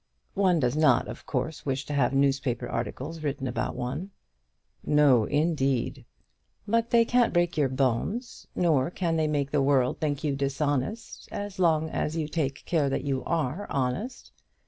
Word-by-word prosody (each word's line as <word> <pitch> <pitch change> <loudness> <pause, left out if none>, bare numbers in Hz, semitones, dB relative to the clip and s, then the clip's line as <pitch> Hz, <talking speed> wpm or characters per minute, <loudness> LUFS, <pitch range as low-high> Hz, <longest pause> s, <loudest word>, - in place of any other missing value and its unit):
One 185 -4 +3
does 125 -2 +1
not, 155 0 +4
of - - -9
course, 150 +4 -3
wish 135 0 -2
to 150 - -5
have 140 -4 +2
newspaper 135 -3 +1
articles 140 +8 -4
written 145 -2 -3
about 125 -1 -2
one." 140 +10 -4 0.7
"No, 140 -7 +4
indeed." 145 -4 0 0.6
"But 230 +2 +1
they 235 -1 +5
can't 245 0 +3
break 175 -1 +1
your 145 -3 +2
bones, 135 - -1
nor 155 -6 +2
can 170 -2 -1
they 160 -1 +1
make 145 -2 -1
the 145 - +2
world 135 -2 +2
think 145 -2 -1
you 145 -3 0
dishonest, 140 - -2
as 205 -1 -5
long 160 -3 +2
as 155 +2 -2
you 155 -2 -1
take 150 -3 -3
care 155 -5 +1
that 135 - -2
you 135 -3 -1
are 165 +4 -1
honest. 140 - -3
145 Hz, 165 wpm, -27 LUFS, 135-170 Hz, 0.7 s, they